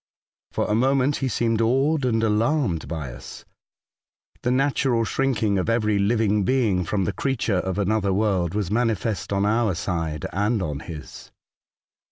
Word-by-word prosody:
For - - -1
a - - 0
moment 135 +4 +2
he 135 - -1
seemed 115 -1 0
awed 135 +5 +2
and 115 -2 +1
alarmed 110 - +1
by 75 -7 -5
us - - -11 0.5
— - - -41
the - - 0
natural 130 -2 +1
shrinking 110 -7 0
of 95 - -1
every 110 -3 +1
living 105 0 +2
being 110 -6 +1
from 95 +2 -1
the - - -1
creature 115 -8 0
of 95 0 -3
another 100 0 +1
world 95 -3 0
was 105 -3 -1
manifest 110 -3 -1
on 100 0 +1
our 110 -2 +1
side 80 -5 -3
and 105 +4 +1
on 75 -4 -3
his. 75 -1 -9
105 Hz, 160 wpm, -24 LUFS, 95-120 Hz, 0.5 s, moment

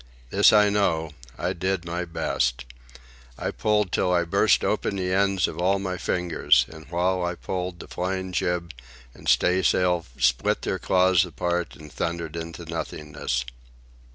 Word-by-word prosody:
This - - +6
I 105 -1 +5
know: 80 -6 +1 0.3
I 90 +2 -1
did 95 0 -2
my 90 +1 -3
best. 60 -7 -1 0.7
I - - -2
pulled 105 -3 +1
till 90 - +1
I 90 -1 +3
burst 85 - +3
open - - 0
the 90 -1 -1
ends 100 -2 +2
of 80 - -7
all 95 +3 +2
my 95 -2 -4
fingers; 90 -2 +2
and 80 -2 -12
while 90 +1 0
I 85 0 -1
pulled, 90 -1 -4
the - - -9
flying 95 +1 -3
jib 90 -2 -1 0.4
and - - -5
staysail 90 +5 +2
split 60 -1 +1
their - - -2
cloths 90 -1 +3
apart 90 0 -2
and 75 -1 -13
thundered 85 +2 -3
into 85 +1 -6
nothingness. 75 -6 -4
90 Hz, 155 wpm, -25 LUFS, 80-95 Hz, 0.7 s, This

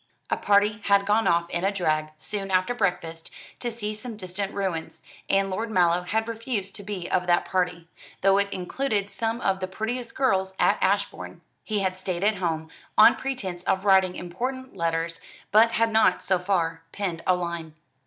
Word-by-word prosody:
A - - +4
party 205 +1 +3
had 200 0 +4
gone 210 +2 +2
off 170 0 +2
in 175 +1 -1
a 195 - +2
drag, 155 -5 0
soon 195 +4 -4
after 185 +5 +2
breakfast, 170 -7 -2 0.3
to 240 - -2
see 215 -2 -4
some 215 +1 -7
distant 190 0 -4
ruins; 185 -5 -3 0.3
and 195 0 +2
Lord 220 +5 -2
Mallow 175 -4 +3
had 220 +5 -1
refused 225 -4 -3
to 200 - -8
be 195 -3 -5
of 180 -1 +1
that 175 0 +3
party, 180 -2 -1 0.3
though 195 +1 +5
it 200 0 0
included 200 +2 -2
some 225 +3 -2
of 190 -1 +1
the 185 - -3
prettiest 230 +5 -4
girls 190 -8 +1
at - - +3
Ashbourne. - - -1 0.2
He 210 -2 -1
had 185 -1 -1
stayed 185 -1 -3
at 210 0 +2
home, 160 -3 -2 0.3
on 215 - +8
pretence 205 -10 -4
of 190 +1 0
writing 190 -2 +4
important 255 +8 -5
letters, 165 -1 -1 0.3
but 220 +2 +6
had 230 0 +2
not, 220 0 +3
so 185 -1 +2
far, 170 -3 0
penned 180 -5 -3
a 185 - +5
line. 170 -3 -5
195 Hz, 185 wpm, -26 LUFS, 175-215 Hz, 0.3 s, on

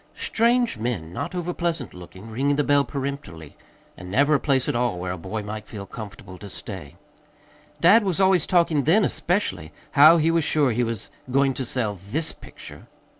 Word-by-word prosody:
Strange 235 - +1
men, 95 -9 -3
not 145 - -4
overpleasant 170 -4 -3
looking, 90 +3 -12
ringing 135 +6 0
the 145 - +1
doorbell 145 0 +3
peremptorily. 135 - -6 0.4
And 90 -1 -10
never 140 +9 +3
a 145 - +4
place 135 -3 +1
at 145 - -1
all 120 -5 0
where 90 +1 -4
a 90 - -4
boy 105 +6 -5
might 105 +1 -7
feel 100 -3 -8
comfortable 100 -4 -10
to 100 - -9
stay. 90 -7 -8 0.9
Dad 205 +7 +6
was 190 -3 -1
always 190 -4 +3
talking 170 -6 +2
then, 195 +7 +4
especially, 190 +4 -2 0.2
how 155 +3 +8
he 165 +1 +2
was 165 -1 +2
sure 145 -3 +2
he 120 +2 0
was 115 -3 -4 0.2
going 135 +1 +2
to 130 +1 -4
sell 115 -4 -1
THIS 100 - -3
picture. - - -13
135 Hz, 180 wpm, -24 LUFS, 105-165 Hz, 0.9 s, how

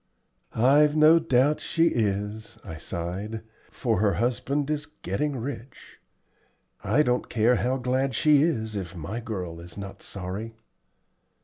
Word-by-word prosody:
"I've 145 +6 +4
no 155 +2 +7
doubt 145 -1 +2
she 165 0 +2
is," 105 0 -2
I 80 - -8
sighed, 95 +8 -5 0.3
"for - - -1
her 105 -2 +3
husband 130 - -1
is 150 -1 -2
getting 145 - -3
rich. 125 0 -8 0.8
I 110 +9 +3
don't 125 -2 0
care 120 +1 +3
how 130 +2 0
glad 130 0 0
she 150 +3 +5
is 110 -9 0
if 95 -3 -5
my 90 +8 -5
girl 95 -8 -5
is 85 +3 -11
not 100 -1 -8
sorry." 100 +4 -5
115 Hz, 135 wpm, -26 LUFS, 100-140 Hz, 0.8 s, no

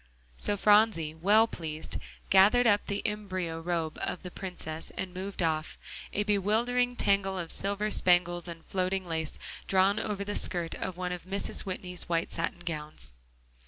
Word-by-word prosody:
So 205 - +1
Phronsie, 205 -7 +4
well 205 +7 +5
pleased, 160 -7 -5 0.3
gathered 205 +6 +6
up 205 -2 +3
the 200 0 -2
embyro 185 -6 -2
robe 165 -2 -2
of - - -2
the 180 - -7
Princess 170 -4 -6
and 185 -1 -4
moved 190 0 -3
off, 155 -1 -1 0.3
a 205 - 0
bewildering 225 +5 +1
tangle 195 -3 +2
of 170 -2 -3
silver 200 +2 -1
spangles 175 -2 +3
and 165 -1 -8
floating 185 0 -1
lace, 160 -2 -3 0.3
drawn 195 +2 +3
over 205 -2 -2
the 205 +1 -3
skirt 175 -3 0
of 185 -2 -4
one 180 0 -2
of 180 -1 -5
Mrs. 195 +1 0
Whitney's 180 -2 -3
white 165 -1 0
satin 170 +1 -2
gowns. 150 - -5
185 Hz, 160 wpm, -30 LUFS, 170-205 Hz, 0.3 s, gathered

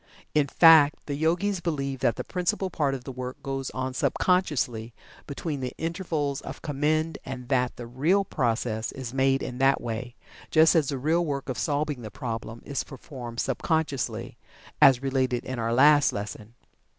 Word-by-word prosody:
In 150 -2 +3
fact, 155 -1 +6
the 145 - -3
Yogis 175 +6 0
believe 140 -6 -2
that 120 - +2
the - - -4
principal 185 +1 -1
part 145 -5 0
of 130 - -8
the 135 - -6
work 125 0 -6
goes 135 -1 -3
on 130 0 -3
sub - - 0
consciously 125 -11 0 0.3
between 145 0 -4
the 130 -1 -4
intervals 160 -5 -2
of - - -9
commend, 155 +2 0
and 125 -1 -7
that 125 -2 +1
the 120 - -8
real 155 +12 +1
progress 115 -6 -1
is 130 -2 -7
made 135 0 +2
in 125 0 -5
that 135 +1 +4
way, 120 +1 -5 0.3
just 160 0 +5
as 160 -4 +2
the 140 - -2
real 160 +6 +1
work 140 -4 -3
of 130 - -3
solving 145 -3 -1
the 110 - -7
problem 115 -2 -6
is 140 - -2
performed 125 -4 -9
sub - - -1
consciously, 160 -6 -2 0.4
as 135 -1 +7
related 130 -2 0
in 130 -2 -4
our 115 0 -1
last 145 +4 +5
lesson. 105 +2 -7
135 Hz, 175 wpm, -26 LUFS, 125-155 Hz, 0.4 s, as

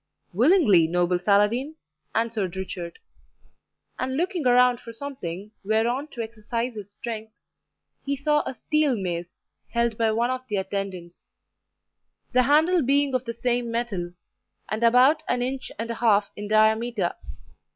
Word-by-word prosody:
"Willingly, 225 - +5
noble 175 +1 +1
Saladin," 210 - +2 0.4
answered 220 -5 -1
Richard; 180 -2 -6 1.0
and 260 +1 -2
looking 350 -4 -1
around 250 0 +5
for 230 - -10
something 215 -7 -7
whereon 230 +7 0
to 240 -6 -5
exercise 230 +2 -4
his 205 -2 -8
strength, 220 0 -7 0.7
he 280 0 -1
saw 295 +2 +1
a 265 - -4
steel 305 -2 +1
mace, 175 -3 -4 0.3
held 235 -1 0
by 225 -1 +3
one 235 +3 +1
of 255 0 -5
the 210 - -2
attendants, 190 -3 -5 1.0
the 255 - +4
handle 315 +7 +4
being 280 +1 +2
of 255 0 0
the 230 - -4
same 240 0 -1
metal, 215 -7 -3 0.6
and 215 +2 -2
about 250 +6 +5
an 245 0 0
inch 260 +1 -4
and 230 +2 -3
a 230 - -7
half 210 -3 +3
in 205 0 -6
diameter. 220 -2 +2
230 Hz, 140 wpm, -25 LUFS, 205-255 Hz, 1.0 s, Willingly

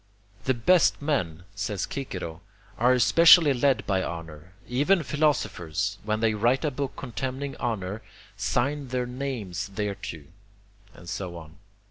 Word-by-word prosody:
"The 130 - +2
best 165 +10 +4
men," 90 - -1
says 100 0 -3
Cicero, 90 - -5 0.4
"are 125 +2 +5
especially 160 +4 +7
led 135 +1 +2
by 95 -2 +1
honour. 85 +1 -7
Even 150 +8 +2
philosophers, 105 - 0
when 110 +1 -1
they 110 -1 +3
write 120 +8 +2
a 150 - +1
book 140 0 -4
contemning 130 +2 -4
honour, 105 -3 -3 0.3
sign 140 +3 -1
their 125 0 -1
names 120 -7 -4
thereto," 100 -7 -4 0.7
and 85 - -14
so 90 -1 -5
on. 80 -1 -12
115 Hz, 130 wpm, -26 LUFS, 95-135 Hz, 0.7 s, especially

